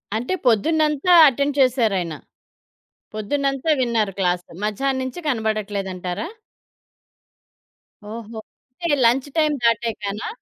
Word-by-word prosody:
అంటే 245 +11 -2
పొద్దునంతా 305 - +2
అటెండ్ 280 +2 0
చేసారయన. 220 - +1 1.0
పొద్దునంతా 275 +7 -1
విన్నారు 230 -5 +1
క్లాస్ 180 -1 0 0.2
మధ్యాహ్నం 260 +6 -1
నుంచి 260 +6 -6
కనపడట్లేదంటారా? 205 - -2 1.9
ఓహో! 225 -1 -8 0.4
అంటే 330 -4 +2
లంచ్ 255 +4 +2
టైమ్ 305 -2 +2
దాటాకనా? 225 - -1
235 Hz, 85 wpm, -21 LUFS, 210-280 Hz, 1.9 s, పొద్దునంతా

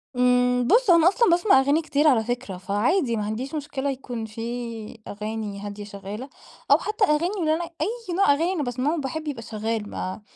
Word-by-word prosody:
امم 250 0 +3
بُص 465 - +4
هو 345 - +8
أنا 325 - +5
أصلًا 435 +5 +4
باسمع 350 -3 +5
أغاني 285 +4 +2
كتير 300 -1 +1
على 240 -7 +4
فكرة، 245 -5 -4
فعادي 230 - +1
ما 210 - -2
عنديش 245 +8 -4
مشكلة 280 -2 -3
يكون 250 -4 -5
في 230 0 -6
أغاني 210 -1 -5
هادية 205 0 -7
شغالة، 205 +5 -8 0.4
أو - - +8
حتى 430 0 -2
أغاني 340 +6 +1
اللي 315 -3 +2
أنا 330 +2 -1 0.2
أي 455 -4 -3
نوع 390 -5 +4
أغاني 335 +6 0
أنا 320 -6 -1
باسمعه 260 +6 -1
باحب 305 +3 -4
يبقى 270 -6 -4
شغال 220 -1 -3
ما 185 +3 -5
250 Hz, 190 wpm, -24 LUFS, 220-315 Hz, 0.4 s, هو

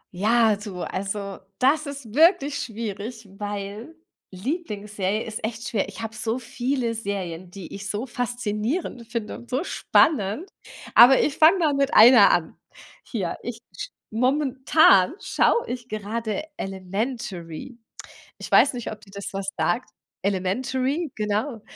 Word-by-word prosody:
Ja, 220 +1 +3
so, 195 -4 -6
also, 200 +1 -4 0.2
das 290 +4 +2
ist 275 -6 -8
wirklich 295 -2 +4
schwierig, 220 0 -6
weil 205 +7 -5 0.3
Lieblingsserie 210 - -3
ist 220 -1 -6
echt 230 +1 -4
schwer. 200 -3 -1
Ich 205 - -8
habe 220 0 -5
so 225 +2 -2
viele 245 0 -2
Serien, 185 -5 -4
die 185 -2 -10
ich 200 +1 -6
so 210 +5 -2
faszinierend 240 - -3
finde 230 -2 -4
und 240 - -15
so 265 +6 0
spannend. 275 - +2 0.5
Aber 250 +3 +8
ich 295 - +1
fange 320 +5 +7
mal 315 -5 +2
mit 275 0 +1
einer 230 -1 +9
an. 160 -2 0 0.5
Hier, - - -3
ich - - -5 0.2
sch - - -6 0.2
momentan 260 - +4
schaue 470 - +2
ich 245 0 -6
gerade 215 +5 -3
Elementary. 195 +2 -5 0.6
Ich - - -9
weiß 275 - +6
nicht, 240 -2 -5
ob 215 -1 -9
dir 210 - -18
das 200 0 -6
was 195 0 -4
sagt. 225 +4 0 0.4
Elementary, 255 - -1
genau 215 +3 -2
225 Hz, 140 wpm, -24 LUFS, 200-260 Hz, 0.6 s, einer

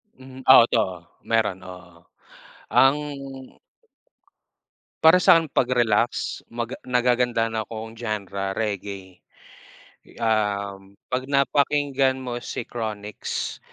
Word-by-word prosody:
Hmm, 130 0 -13
o 130 -3 +9
'to 115 - +2
oh, 95 -3 -3 0.3
meron, 110 -5 +1
oo. 90 -2 -13 0.6
Ang 135 +2 +5 2.1
Para 165 +3 +7
sakin 165 -2 +6
pag 125 - +2
relax 120 -2 +1
mag 120 +1 -4
nagagandahan 120 -2 +1
akong 110 +1 -8
genre 100 -4 -4
reggae. 100 -3 -5 0.9
Um, 100 -3 -2 0.2
pag 130 +1 -2
napakinggan 140 -1 +2
mo 125 -2 -5
si 120 - -5
Chronics. 105 -3 -5
115 Hz, 95 wpm, -24 LUFS, 100-130 Hz, 2.1 s, o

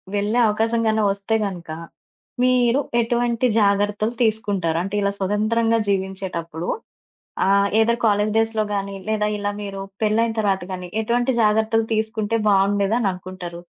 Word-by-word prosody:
వెళ్ళే 205 +4 +1
అవకాశం 225 +2 +1
గాని 220 0 +2
ఒస్తే 200 +3 -2
గనక 175 -4 -6 0.7
మీరు 250 0 +3 0.2
ఎటువంటి 235 +1 0
జాగ్రత్తలు 205 +2 +1
తీసుకుంటారు? 200 -7 0
అంటే, 195 +2 -4
ఇలా 200 0 +1
స్వతంత్రంగా 220 +4 +1
జీవించేటప్పుడు 190 -4 -3 0.8
ఆహ్, 200 0 +4
ఎయిదర్ 235 +1 +2
కాలేజీ 210 0 +2
డేస్‌లో 225 -1 +1
గాని, 195 0 -3
లేదా 210 -1 +1
ఇలా 205 0 -2
మీరు 195 -1 -5 0.2
పెళ్ళైన 225 +2 +2
తర్వాత 195 -3 0
గాని, 180 -1 -6
ఎటువంటి 240 +3 +1
జాగ్రత్తలు 220 +1 +2
తీసుకుంటే, 220 0 -1
బావుండేదని 200 +2 +2
అనుకుంటారు? 180 -2 -8
210 Hz, 125 wpm, -22 LUFS, 195-225 Hz, 0.8 s, ఆహ్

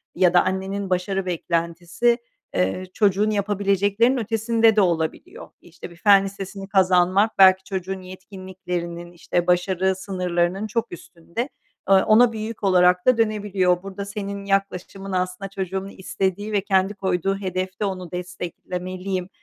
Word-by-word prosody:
ya 180 -1 +3
da 175 - +5
annenin 190 +1 -3
başarı 185 +1 -1
beklentisi, 170 +6 0 0.4
eee, 95 - 0
çocuğun 205 0 +2
yapabileceklerinin 205 +3 +1
ötesinde 225 0 +2
de 215 - +5
olabiliyor. 180 - -2
İşte, - - -11
bir 170 - -15
fen 195 +3 +5
lisesini 195 0 -7
kazanmak 190 +2 +3
belki 190 0 +7
çocuğun 190 0 -4
yetkinliklerinin, 185 -2 -7
işte, 175 0 -2
başarı 185 +1 +1
sınırlarının 185 +1 -1
çok 230 +2 -2
üstünde. 175 - -6 0.4
Eee, 195 - +7
ona 230 +2 +5
bir 220 - -5
yük 215 0 -6
olarak 180 -1 +4
da 255 -2 +5
dönebiliyor. 200 -5 +1
Burada 195 0 -6
senin 200 -1 -6
yaklaşımın 195 0 -2
aslında 185 +1 -2
"Çocuğumun 190 0 -4
istediği 195 +1 -3
ve 205 -2 +1
kendi 195 0 +1
koyduğu 195 -1 -1
hedefte 185 +1 -3
onu 185 -3 -5
desteklemeliyim." 180 +1 -5
190 Hz, 135 wpm, -23 LUFS, 180-200 Hz, 0.4 s, belki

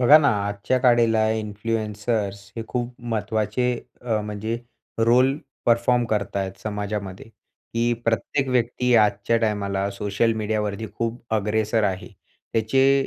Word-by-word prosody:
बघा 135 +5 +8
ना, 145 -2 +3 0.2
आजच्या 100 +5 0
काळाला 115 -3 +4
इन्फ्लुएन्सर्स 105 -1 -2
हे 115 - -2
खूप 125 0 -3
महत्त्वाचे 110 +1 -1 0.3
अ, 115 -3 0
म्हणजे 105 +2 -3 0.4
रोल 125 +4 +4 0.3
परफॉर्म 120 +1 +3
करतायेत 100 -2 -1
समाजामध्ये, 105 -1 -4
की 115 +1 -4
प्रत्येक 115 +4 0
व्यक्ती 125 0 +1
आजच्या 105 +1 +3
टाईमाला 100 -3 0
सोशल 105 +3 0
मीडियावरती 105 0 -2
खूप 115 +1 -2
अग्रेसर 110 +1 +1
आहे. 95 -2 -2 0.4
त्याचे 135 +5 +3
110 Hz, 115 wpm, -24 LUFS, 105-120 Hz, 0.4 s, बघा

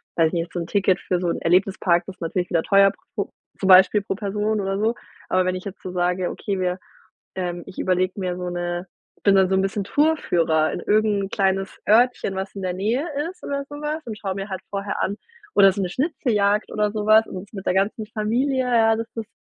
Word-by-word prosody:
weiß 165 -1 +4
ich 160 - -6
nicht, 170 0 -2
so 175 - -2
'n 170 - -4
Ticket 195 -2 +2
für 180 - -1
so 175 -1 -1
'n - - -2
Erlebnispark 180 0 +2
ist 190 - -10
natürlich 175 +2 -2
wieder 165 - +2
teuer 195 -1 +5 0.2
pro - - -3 0.3
zum 195 - 0
Beispiel 190 +2 +7
pro 200 - -2
Person 210 +1 -1
oder 195 0 -2
so, 220 +3 +1 0.4
aber 185 0 +3
wenn 185 - 0
ich 185 - -7
jetzt 200 -1 -8
so 185 - -6
sage: 180 0 0
„Okay, 200 -3 -3
wir, 180 0 0 0.6
ähm 175 -2 -3
ich - - -10
überlege 185 +1 0
mir 180 -2 -2
so 180 0 -4
'ne 175 0 -3 0.4
bin 200 -1 +5
dann 190 -1 +5
so 190 - +2
'n 190 - +3
bisschen 195 +1 -1
Tour-Führer 175 - +2
in - - -3
irgend 210 -1 +2
'n - - -9
kleines 195 -1 -1
Örtchen, 230 -2 +3
was 190 +1 -4
in 195 - -6
der 180 -1 -1
Nähe 220 - -1 0.2
ist 370 - -14
oder 280 0 -3
so 290 - -8
was, 305 +1 -3
und 220 -2 -5
schaue 195 -2 -3
mir 195 +1 -5
halt 190 -1 -5
vorher 200 0 -3
an 200 - -1 0.4
oder 195 -1 +7
so 200 +1 -3
'ne 185 - -1
Schnitzeljagd 215 - 0
oder 210 -1 0
sowas 215 +1 +4
und 190 +3 -9
mit 195 -2 -7
der - - +2
ganzen 200 +3 0
Familie, 235 +6 0
ja, 225 -2 +4
das 225 0 -4
ist 225 -1 -5
195 Hz, 230 wpm, -23 LUFS, 185-215 Hz, 0.6 s, Beispiel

